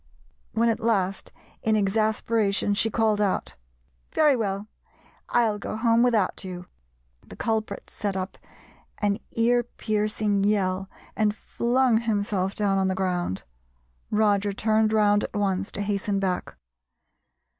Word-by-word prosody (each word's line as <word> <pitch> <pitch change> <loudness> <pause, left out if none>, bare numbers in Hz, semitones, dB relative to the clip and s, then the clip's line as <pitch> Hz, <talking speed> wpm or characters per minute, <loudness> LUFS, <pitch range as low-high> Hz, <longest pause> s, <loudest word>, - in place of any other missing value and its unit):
When 230 +1 +2
at 230 0 +1
last 195 -5 0 0.3
in 220 0 +2
exasperation 215 0 +1
she 220 +2 +2
called 220 -2 +1
out, 200 -2 0 0.6
"Very 300 -3 +4
well, 200 -3 -2 0.6
I'll 220 -3 +2
go 205 - -5
home 230 0 +3
without 225 -7 +2
you," 180 -1 -7 0.6
the - - -12
culprit 220 -3 -2
set 200 -2 -3
up 185 +1 -5 0.6
an 205 -1 0
ear 240 +1 +3
piercing 210 -3 -1
yell 190 -2 +1 0.3
and 210 -1 +1
flung 240 +1 +1
himself 205 -4 -1
down 200 -2 +1
on 190 - +2
the 190 - 0
ground. 180 - -1 0.7
Roger 205 -1 +2
turned 215 +1 +2
round 205 -1 +3
at - - -6
once, 195 -1 0
to 200 - -4
hasten 205 0 -1
back. 185 -2 -2
210 Hz, 130 wpm, -25 LUFS, 195-220 Hz, 0.7 s, Very